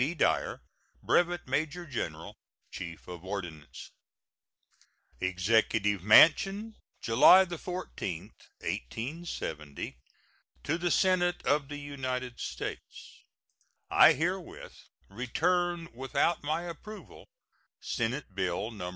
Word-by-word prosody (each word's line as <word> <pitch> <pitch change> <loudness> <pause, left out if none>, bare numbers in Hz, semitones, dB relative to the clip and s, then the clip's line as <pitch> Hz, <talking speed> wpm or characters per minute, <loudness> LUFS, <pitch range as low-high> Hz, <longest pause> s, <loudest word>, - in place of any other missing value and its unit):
B. 150 +7 0
DYER, - - 0 0.4
Brevet 175 -2 +1
Major 155 +6 -1
General, 85 - -5 0.4
Chief 85 -2 -8
of 90 -1 -8
Ordnance. 85 -6 -7 1.3
EXECUTIVE 100 +1 +1
MANSION, 195 - +5 0.3
July 135 +11 +7
14, 175 - -5 0.3
1870. 80 - -5 0.7
To 160 +4 -1
the 175 0 0
Senate 175 -1 +2
of 145 -1 +2
the 145 +1 -6
United 130 -4 -4
States: - - -7 0.7
I - - +8
herewith 180 +4 -3 0.3
return 165 - 0
without 140 +6 0
my 155 +4 -1
approval 210 +5 -10 0.5
Senate 120 -1 -3
bill 95 +3 -2
No. 90 -5 -6
135 Hz, 90 wpm, -30 LUFS, -, 1.3 s, I